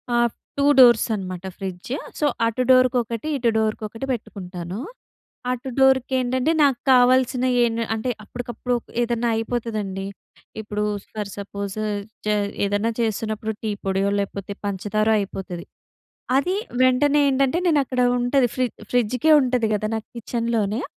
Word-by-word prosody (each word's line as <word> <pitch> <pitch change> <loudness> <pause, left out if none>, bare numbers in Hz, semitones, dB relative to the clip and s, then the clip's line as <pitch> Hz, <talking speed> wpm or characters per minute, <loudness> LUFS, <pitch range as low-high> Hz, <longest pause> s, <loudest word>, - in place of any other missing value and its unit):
ఆహ్, 240 -1 +3 0.3
two 280 - +2
doors 240 -3 +7
అనమాట 185 -2 -6
fridge. 190 +2 -6 0.3
So, 300 - +2 0.2
అటు 230 +3 0
డోర్‌కొకటి, 250 -1 +2
ఇటు 240 -2 +2
డోర్‌కొకటి 220 +2 -2
పెట్టుకుంటాను. 185 -4 -6 0.7
అటు 250 +1 -4
డోర్‌కి 265 -1 +4
ఏంటంటే 255 +4 +1
నాకు 275 -4 +3
కావాల్సిన 255 0 +4 0.2
ఏ‌న్ 230 -1 0 0.2
అంటే 225 +3 -2
అప్పటికప్పుడు 245 +2 -4 0.3
ఏదన్నా 235 0 0
అయిపోతదండి, 215 -4 -3 0.5
ఇప్పుడు 210 -1 -3 0.3
ఫర్ 210 -2 -4
సపోజ్ 200 0 -5 0.5
చే 210 - +3 0.3
ఏదన్నా 205 +3 0
చేస్తున్నప్పుడు 220 0 -2
టీ 215 - -1
పొడియో, 195 +1 +1
లేకపోతే 200 0 -4 0.2
పంచదారో 215 +3 0
అయిపోతది. 190 -3 -5 0.7
అది 360 +7 0 0.3
వెంటనే 275 +3 +4
ఏంటంటే, 270 +3 +2
నేను 300 -3 +4
అక్కడ 255 0 -2 0.2
ఉంటది 245 +1 +2
ఫ్రి 255 - +2 0.3
ఫ్రిడ్జ్‌కే 250 +5 +3
ఉంటది 250 -3 +1
కదా 215 +1 -1
నాకు 220 - -7
కిచెన్‍లోనే... 230 -1 -1
230 Hz, 125 wpm, -23 LUFS, 205-255 Hz, 0.7 s, doors